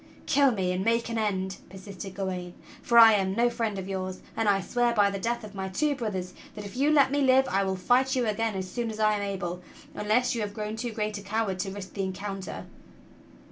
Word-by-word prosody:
"Kill 280 Hz, -1 st, +4 dB
me 190 Hz, -6 st, 0 dB
and 180 Hz, +1 st, -1 dB
make 230 Hz, +2 st, +1 dB
an 230 Hz, -1 st, -1 dB
end!" 190 Hz, -3 st, -1 dB
persisted 190 Hz, 0 st, -9 dB
Gawain, 180 Hz, -2 st, -4 dB, 0.3 s
"for 235 Hz, -, +2 dB
I 225 Hz, -1 st, +10 dB
am 190 Hz, -2 st, +1 dB
no 240 Hz, +1 st, +3 dB
friend 225 Hz, -4 st, -2 dB
of 190 Hz, -1 st, -5 dB
yours; 185 Hz, -1 st, -4 dB, 0.2 s
and 225 Hz, -2 st, +1 dB
I 195 Hz, -1 st, +3 dB
swear 240 Hz, +4 st, 0 dB
by 205 Hz, -2 st, +4 dB
the 195 Hz, -, -4 dB
death 235 Hz, +3 st, -2 dB
of 210 Hz, -1 st, -9 dB
my 190 Hz, -1 st, -4 dB
two 295 Hz, +10 st, +1 dB
brothers 195 Hz, -8 st, -4 dB, 0.2 s
that 210 Hz, -1 st, -7 dB
if 200 Hz, -, -9 dB
you 280 Hz, +4 st, +2 dB
let 285 Hz, -3 st, +5 dB
me 285 Hz, 0 st, +1 dB
live 265 Hz, 0 st, +4 dB
I 195 Hz, -4 st, +1 dB
will 190 Hz, -1 st, -1 dB
fight 250 Hz, +8 st, +2 dB
you 250 Hz, -2 st, +1 dB
again 220 Hz, 0 st, -1 dB
as 190 Hz, -1 st, -3 dB
soon 230 Hz, +5 st, -3 dB
as 220 Hz, 0 st, -6 dB
I 215 Hz, 0 st, +4 dB
am 205 Hz, -, -1 dB
able, 185 Hz, -3 st, -4 dB, 0.3 s
unless 215 Hz, +4 st, +1 dB
you 235 Hz, -, -2 dB
have 205 Hz, -1 st, -4 dB
grown 215 Hz, 0 st, -4 dB
too 235 Hz, +1 st, -4 dB
great 210 Hz, -1 st, -3 dB
a -, -, -9 dB
coward 200 Hz, -1 st, -2 dB
to 195 Hz, +1 st, -2 dB
risk 195 Hz, -1 st, -8 dB
the 200 Hz, -, -3 dB
encounter!" 195 Hz, 0 st, -5 dB
210 Hz, 240 wpm, -27 LUFS, 190-235 Hz, 0.3 s, I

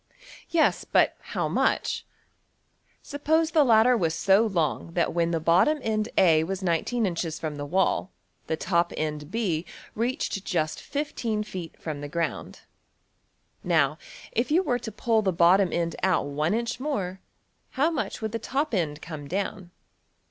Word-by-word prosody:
Yes, 330 Hz, -2 st, +2 dB
but -, -, +3 dB
how -, -, -3 dB
much? -, -, 0 dB, 1.0 s
Suppose 315 Hz, +3 st, +1 dB
the 310 Hz, -2 st, +5 dB
ladder 235 Hz, 0 st, +5 dB
was 165 Hz, -7 st, 0 dB
so 195 Hz, +6 st, +4 dB
long 165 Hz, -3 st, -1 dB
that 170 Hz, -, +1 dB
when 170 Hz, 0 st, +1 dB
the 165 Hz, -1 st, 0 dB
bottom 175 Hz, -, +4 dB
end~$A$ 210 Hz, -7 st, +3 dB
was 190 Hz, +3 st, -4 dB
$19$~inches 170 Hz, -2 st, -1 dB
from 155 Hz, -2 st, -4 dB
the 145 Hz, 0 st, -5 dB
wall 185 Hz, +2 st, +1 dB, 0.4 s
the 160 Hz, -, -1 dB
top 170 Hz, 0 st, +1 dB
end~$B$ 155 Hz, +4 st, -2 dB, 0.3 s
reached 230 Hz, -4 st, -2 dB
just 155 Hz, -6 st, -1 dB
$15$~feet 215 Hz, -, -4 dB
from 150 Hz, -3 st, -5 dB
the 145 Hz, -, -6 dB
ground. 170 Hz, +1 st, -3 dB, 1.0 s
Now, 160 Hz, -3 st, +2 dB, 0.3 s
if 235 Hz, +3 st, 0 dB
you 340 Hz, +5 st, +3 dB
were 245 Hz, -7 st, 0 dB
to 225 Hz, -, -6 dB
pull 225 Hz, -1 st, +1 dB
the 195 Hz, -3 st, +1 dB
bottom 180 Hz, +2 st, +4 dB
end 170 Hz, -1 st, -1 dB
out 190 Hz, -5 st, +2 dB
$1$~inch 170 Hz, -, -1 dB
more, 200 Hz, -10 st, -3 dB, 0.6 s
how 305 Hz, +5 st, +3 dB
much 280 Hz, -6 st, -3 dB
would 220 Hz, -, -2 dB
the 230 Hz, -, -3 dB
top 275 Hz, +5 st, -2 dB
end 155 Hz, -6 st, -1 dB
come 155 Hz, -3 st, -7 dB
down? 190 Hz, +1 st, -3 dB
190 Hz, 145 wpm, -26 LUFS, 165-230 Hz, 1.0 s, the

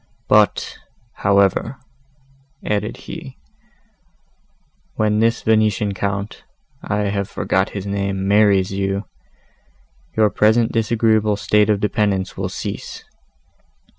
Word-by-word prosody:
"But, -, -, +2 dB, 0.4 s
however," 100 Hz, +5 st, +2 dB, 0.9 s
added 105 Hz, -2 st, -2 dB
he, -, -, -9 dB, 1.6 s
"when 105 Hz, 0 st, +1 dB
this 115 Hz, +1 st, +1 dB
Venetian 110 Hz, -2 st, +2 dB
Count 100 Hz, +2 st, -4 dB, 0.4 s
(I 105 Hz, 0 st, -2 dB
have 100 Hz, -1 st, -2 dB
forgot 95 Hz, +1 st, 0 dB
his 100 Hz, -, -5 dB
name) 100 Hz, -1 st, -2 dB
marries 100 Hz, -2 st, +3 dB
you, 95 Hz, +1 st, -2 dB, 1.1 s
your 105 Hz, -2 st, +4 dB
present 110 Hz, +2 st, +3 dB
disagreeable 110 Hz, -2 st, +2 dB
state 105 Hz, +1 st, +2 dB
of 105 Hz, -2 st, +2 dB
dependence 100 Hz, -2 st, -1 dB
will -, -, -3 dB
cease. -, -, -6 dB
105 Hz, 100 wpm, -20 LUFS, 100-110 Hz, 1.6 s, your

